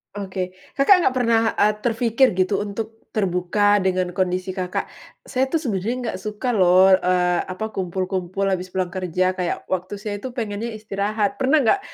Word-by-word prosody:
Oke. 185 -2 -4 0.2
Kakak 355 +6 +5
nggak 260 - +2
pernah, 230 -2 +3 0.2
eee, 210 +1 +4
terfikir 240 +2 +2
gitu 190 +2 +1
untuk 220 +2 -5 0.2
terbuka 205 +1 +2
dengan 185 -1 0
kondisi 185 +1 -1
Kakak? 185 -1 -3 0.4
"Saya 265 0 0
tu 325 - +1
sebenarnya 230 - -2
enggak 245 - -3
suka 215 +5 -3
loh, 185 -1 +6
eee, 180 -1 +2
apa 215 +4 -5
kumpul-kumpul 185 +1 -2
habis 185 -1 -1
pulang 180 -1 -2
kerja, 185 0 0
kayak 180 -2 -3
waktu 185 +1 -3
saya 205 0 -5
itu 260 - -5
pengennya 220 0 -3
istirahat." 210 -1 -2
Pernah 270 +4 +3
nggak 395 - +4
195 Hz, 160 wpm, -22 LUFS, 185-220 Hz, 0.4 s, loh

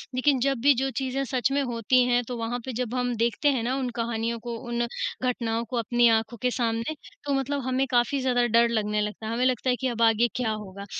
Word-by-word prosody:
लेकिन 265 +1 +3
जब 275 +1 +1
भी 285 +3 +6
जो 265 +2 0
चीज़ें 265 +1 -1
सच 255 +1 0
में 280 +1 +2
होती 245 0 +2
हैं, 245 0 +3
तो 245 - -4
वहाँ 230 +2 -3
पे 260 - -4
जब 245 0 -3
हम 245 -1 0
देखते 235 +5 +1
हैं 260 -5 0
ना 250 +3 0
उन 260 -2 -2
कहानियों 230 0 -2
को, 235 +1 -5
उन 240 0 0 0.4
घटनाओं 230 -2 -1
को 250 - -2
अपनी 240 +1 +3
आँखों 225 +1 +1
के 250 -1 +1
सामने, 230 +3 -1 0.3
तो 285 - 0
मतलब 275 +1 -1
हमें 260 +1 +1
काफ़ी 245 +3 +2
ज़्यादा 245 -2 +2
डर 235 +1 +4
लगने 210 -2 0
लगता 210 +1 -4
है। - - -3
हमें 245 +2 +1
लगता 255 0 +1
है 250 - +3
कि 265 - 0
अब 235 -2 -3
आगे 225 +1 +4
क्या 245 -3 0
होगा, 200 -2 -7
240 Hz, 240 wpm, -26 LUFS, 230-255 Hz, 0.4 s, भी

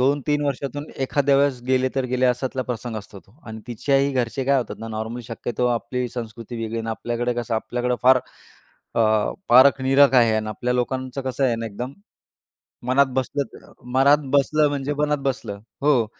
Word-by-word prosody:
2-3 145 +2 +1
वर्षातून 140 +1 -3 0.2
एखाद्या 140 +1 +2
वेळेस 140 -2 +2
गेले 130 0 +2
तर 135 - 0
गेले 130 0 +2
अश्यातला 130 +1 -1
प्रसंग 120 -1 -4
असतो 100 -1 -9
तो. 95 - -26
अन् 110 -1 -7
तिच्याही 135 +4 +1
घरचे 130 +1 -1
काय 140 +1 +3
होतात 120 - -4
ना 115 - -7
नॉर्मली 110 +2 -5
शक्यतो 120 +1 -3
आपली 120 +1 -2
संस्कृती 115 0 -7
वेगळी 115 0 -4
आहे, - - -1
अन् 115 - -5
आपल्याकडे 120 +2 -2
कसं 120 -1 -2
आपल्याकडे 125 +2 -1
फार 130 +1 +6 0.8
अ, - - +3 0.5
पारख-निरख 135 +2 +6
आहे 115 -3 +5
आणि 110 0 -2
आपल्या 120 +4 -2
लोकांचं 130 +2 -2
कसं 130 +1 -1
आहे 125 -3 +2
ना 115 0 -4
एकदम, 120 +5 -6 1.0
मनात 135 +2 +4
बसलं 135 +2 0
तर - - -15 0.2
मनात 140 +3 +5 0.2
बसलं 150 +2 +3
म्हणजे 145 0 -2
मनात 150 0 +1
बसलं. 120 -7 -3 0.2
हो, 140 -5 +3
125 Hz, 175 wpm, -23 LUFS, 115-135 Hz, 1.0 s, फार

